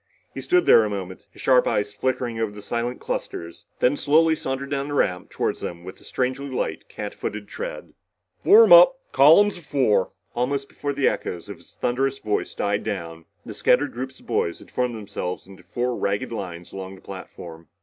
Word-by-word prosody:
He - - -6
stood 360 -1 +2
there 115 - +7
a 105 - -1
moment, 95 -2 -6
his - - -13
sharp 130 -2 +4
eyes 105 0 0
flicking 125 0 -2
over 110 -2 -1
the 105 0 -11
silent 120 +3 -3
clusters, 85 0 -5
then 130 +3 +4
slowly 160 +3 +3
sauntered 135 -1 -4
down 140 0 -1
the 145 - -4
ramp 90 -9 0
toward - - -2
them 85 0 -6
with 95 +2 -10
a - - -18
strangely 130 +2 -2
light, 130 - -3
catfooted - - -6
tread. - - -7 0.5
"Form 450 +4 +7
up! - - +9 0.2
Column 205 0 +7
of 200 - -7
fours!" 130 -10 +2 0.3
Almost 135 +3 -1
before 145 -1 -4
the 140 -1 +2
echoes 85 -2 -3
of - - -8
the - - -17 0.2
thunderous 135 +2 0
voice 105 -5 -2
died 100 0 -1
down, 85 -6 -5 0.2
the - - -7
scattered - - +2
groups 130 +2 -6
of - - -20
boys 85 - -1
had - - -16
formed 125 -2 -1
themselves 95 -4 -5
into 95 0 -14
four 125 0 -2
ragged 100 +5 -2
lines 90 -6 -6
along 95 0 -7
the 95 - -17
platform. 85 -4 -10
120 Hz, 190 wpm, -24 LUFS, 95-135 Hz, 0.5 s, up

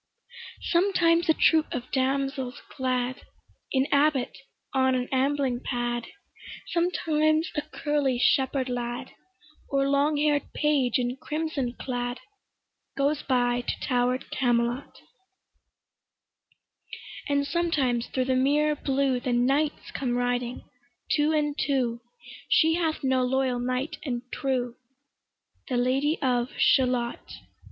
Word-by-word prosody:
Sometimes 340 -2 +2
a - - +7
troop 320 -1 +3
of 250 0 -5
damsels 270 -1 -1 0.2
glad, 255 -1 -1 0.5
An 265 0 +2
abbot 285 -2 +2 0.4
on 260 -1 +3
an 250 0 -1
ambling 270 -1 +1
pad, 240 -2 -2 0.6
Sometimes 315 -2 +1
a 295 - 0
curly 295 -3 -1
shepherd 265 +1 +2
lad, 245 -1 -4 0.6
Or 275 0 +1
long 285 +2 +2
hair'd 295 -1 +1
page 285 -5 +2
in 250 0 -2
crimson 300 -4 -3
clad, 245 -1 -4 0.8
Goes 285 +2 +1
by 245 -2 +1
to - - -4
tower'd 250 0 0
Camelot; 240 +1 0 2.3
And 280 0 +2
sometimes 280 -7 0
thro' 260 - -1
the 260 0 0
mirror 295 +4 +3
blue 270 -2 0
The 245 0 -2
knights 275 +5 +1
come 245 -3 -1
riding 245 0 -1 0.5
two 300 +1 +3
and 295 -2 +1
two: 250 -5 0 0.5
She 320 0 +4
hath 325 -3 -1
no 260 -1 +2
loyal 255 -1 +1
knight 255 +4 -2
and 245 -5 -3
true, 250 -3 -1 0.9
The 255 - -1
Lady 270 +5 +1
of 250 -1 +1
Shalott. 250 -3 +1
265 Hz, 115 wpm, -26 LUFS, 245-295 Hz, 2.3 s, a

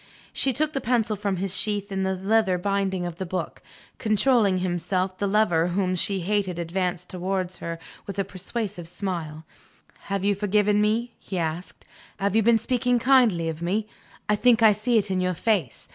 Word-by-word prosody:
She 270 - +2
took 310 +4 0
the 275 - -2
pencil 230 -3 +1
from 200 -2 -2
its 190 +1 -2
sheath 205 +1 -2
in 190 0 -1
the 190 0 0
leather 195 0 +2
binding 190 -1 -1
of 175 -1 -5
the 190 - -3
book. 185 +1 -4 0.4
Controlling 215 -2 +3
himself, 185 +1 -1
the 200 - 0
lover 195 -5 +3
whom 185 +1 0
she 190 +1 0
hated 190 -1 -1
advanced 180 +1 -2
towards 185 0 -3
her 170 0 -5 0.3
with 200 - -6
a 195 - +1
persuasive 190 -1 -5
smile. 170 -4 -5 0.6
"Have 195 -1 -2
you 205 - +3
forgiven 205 +1 +2
me?" 225 +3 0
he 190 - -6
asked. 165 +1 -4 0.3
"Have 200 +1 0
you 225 - +5
been 230 +1 +5
speaking 245 +2 +1
kindly 235 -9 +4
of 160 0 -4
me? 200 +5 0 0.4
I 210 - +3
think 230 +1 +4
I 220 - +8
see 230 +3 +1
it 205 -2 0
in 185 -1 +1
your 180 0 0
face. 185 - -1
195 Hz, 185 wpm, -25 LUFS, 180-215 Hz, 0.6 s, I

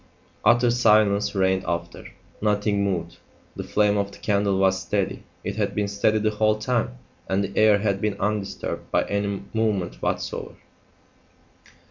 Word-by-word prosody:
Utter 120 0 +4
silence 105 -4 +3
reigned 95 -1 +2
after. 85 0 -4 0.3
Nothing 105 -1 +1
moved. 85 -4 -2 0.4
The - - -5
flame 105 -1 +2
of 100 0 -2
the - - -13
candle 100 -2 +1
was 95 0 +2
steady. 95 +2 -2 0.2
It - - -4
had - - -1
been 105 -1 0
steady 100 +2 +1
the 110 0 +1
whole 110 0 +2
time, 110 - -1 0.3
and 95 +1 +1
the 100 0 -5
air 110 -1 +5
had 100 -1 -1
been 105 -1 -1
undisturbed 105 -1 -3
by - - +2
any 100 -1 -2
movement 100 - -1
whatsoever. - - -3
100 Hz, 150 wpm, -24 LUFS, 95-105 Hz, 0.4 s, air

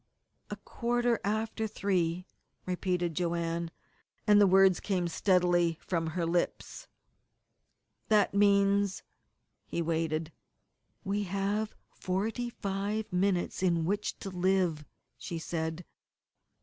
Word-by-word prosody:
"A - - -4
quarter 240 -1 -1
after 220 +2 -1
three," 180 -4 -1 0.4
repeated 180 -2 -1
Joanne, 170 0 -1 0.6
and 205 0 +6
the 200 - +7
words 190 -1 +5
came 185 -4 -1
steadily 175 -2 +2
from 165 -3 -2
her 170 +1 -2
lips. 175 - -2 1.2
"That 210 -3 +3
means 200 -1 +3 0.3
" - - -50
He - - -3
waited. 160 -1 -1 0.7
"We 205 +1 -1
have 200 +3 -1 0.2
forty 220 +6 -2
five 205 0 -3
minutes 180 -1 0
in 170 -3 +2
which 205 +4 -1
to 195 - -5
live!" 180 -4 +1 0.3
she 170 - -5
said. 160 +1 -4
185 Hz, 110 wpm, -30 LUFS, 170-205 Hz, 1.2 s, the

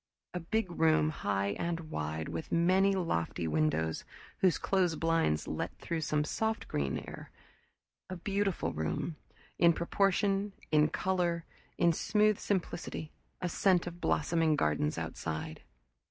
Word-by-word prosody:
A 180 - -2
big 185 +3 -1
room, 160 -2 +3
high 100 -8 -1
and 165 -2 -3
wide, 80 +1 -3
with 160 - -5
many 185 +4 +4
lofty 85 - -1
windows 80 +1 0 0.4
whose 185 -4 +4
closed 180 -4 +1
blinds 165 - +1
let - - -3
through 165 -1 -3
soft 155 +10 -1
green 70 -2 -1
lit - - -5
air; - - -9 0.8
a 185 - -4
beautiful 195 +1 -1
room, 80 - -2 0.4
in 170 -1 +6
proportion, 195 +3 +1 0.2
in 150 -1 +5
color, 175 -2 0 0.3
in 170 -1 +4
smooth 210 +4 +2
simplicity; 175 -5 -3 0.3
a 180 - 0
scent 180 0 +3
of 175 0 -7
blossoming 160 0 +2
gardens 75 - +1
outside. 80 0 -4
165 Hz, 130 wpm, -32 LUFS, -, 0.8 s, in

